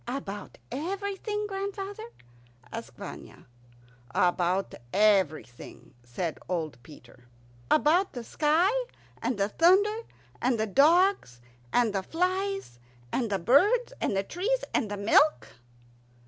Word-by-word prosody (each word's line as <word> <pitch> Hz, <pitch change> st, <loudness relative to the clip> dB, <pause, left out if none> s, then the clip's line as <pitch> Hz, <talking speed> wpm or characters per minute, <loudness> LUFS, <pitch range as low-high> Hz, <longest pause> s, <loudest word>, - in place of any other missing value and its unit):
"About 225 Hz, -6 st, -6 dB
everything, 400 Hz, -, -3 dB
grandfather?" 400 Hz, +2 st, -5 dB, 0.6 s
asked -, -, -7 dB
Vanya. -, -, -10 dB, 0.7 s
"About 180 Hz, +2 st, +1 dB, 0.2 s
everything," 190 Hz, -, 0 dB
said 155 Hz, +8 st, -4 dB
old 160 Hz, -8 st, -3 dB
Peter. 125 Hz, -2 st, -16 dB, 0.4 s
"About 340 Hz, +6 st, +3 dB
the 245 Hz, -, -6 dB
sky, 315 Hz, -, +2 dB, 0.5 s
and 250 Hz, -, -1 dB
the 200 Hz, 0 st, +1 dB
thunder, 385 Hz, -, +4 dB, 0.4 s
and 245 Hz, -2 st, +1 dB
the 220 Hz, -, +1 dB
dogs, 300 Hz, -, +3 dB, 0.3 s
and 235 Hz, -4 st, +2 dB
the 195 Hz, -, 0 dB
flies, 370 Hz, -, -2 dB, 0.3 s
and 235 Hz, -4 st, -1 dB
the 200 Hz, -, 0 dB
birds, 405 Hz, -, +3 dB
and 195 Hz, -, 0 dB
the 195 Hz, -, +1 dB
trees, 435 Hz, -, -1 dB
and 215 Hz, -, 0 dB
the 205 Hz, -, -4 dB
milk?" 230 Hz, +9 st, +3 dB
275 Hz, 115 wpm, -28 LUFS, -, 0.7 s, thunder